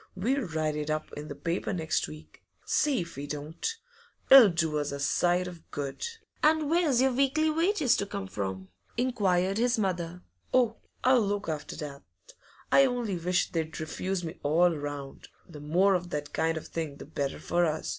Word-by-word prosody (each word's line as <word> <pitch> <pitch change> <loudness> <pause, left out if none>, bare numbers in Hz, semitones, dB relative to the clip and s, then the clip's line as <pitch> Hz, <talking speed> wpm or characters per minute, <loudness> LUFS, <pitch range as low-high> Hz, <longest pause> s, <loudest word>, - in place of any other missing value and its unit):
We'll 245 +5 0
write 155 -2 -1
it 150 0 -3
up 155 0 -2
in 150 +1 -7
the - - -6
paper 170 +2 -2
next 160 -3 0
week, 75 +1 -12 0.2
see 285 -9 +2
if 170 - -8
we 145 +1 -5
don't! 150 - -4 0.6
It'll 265 -6 +11
do 160 -3 0
us 145 -1 -2
a 140 - -4
sight 175 +5 +2
of 175 -2 -11
good.' 140 - -4 0.3
'And 310 -1 +3
where's 310 -8 +3
your 265 - +3
weekly 275 +4 +2
wages 330 - +2
to 200 - -2
come 200 -1 -4
from?' 95 - -5 0.3
inquired 200 -6 +1
his 245 0 +2
mother. 180 -4 -2 0.3
'Oh, 240 -3 +3 0.3
I'll 255 -1 +5
look 205 0 -1
after 155 -2 -4
that. 145 -3 -7 0.7
I 275 - +7
only 240 -6 -2
wish 175 +1 0
they'd 160 -3 -3
refuse 180 +4 -3
me 165 +2 -6
all 165 +4 +3
round; 145 -2 -6 0.2
the 155 -4 -10
more 180 +7 +3
of 180 -1 -1
that 150 -2 -4
kind 160 0 +1
of 160 - -6
thing 160 -4 -4
the - - -10
better 140 -2 -3
for 175 0 +1
us. 155 0 -2
175 Hz, 185 wpm, -29 LUFS, 150-230 Hz, 0.7 s, It'll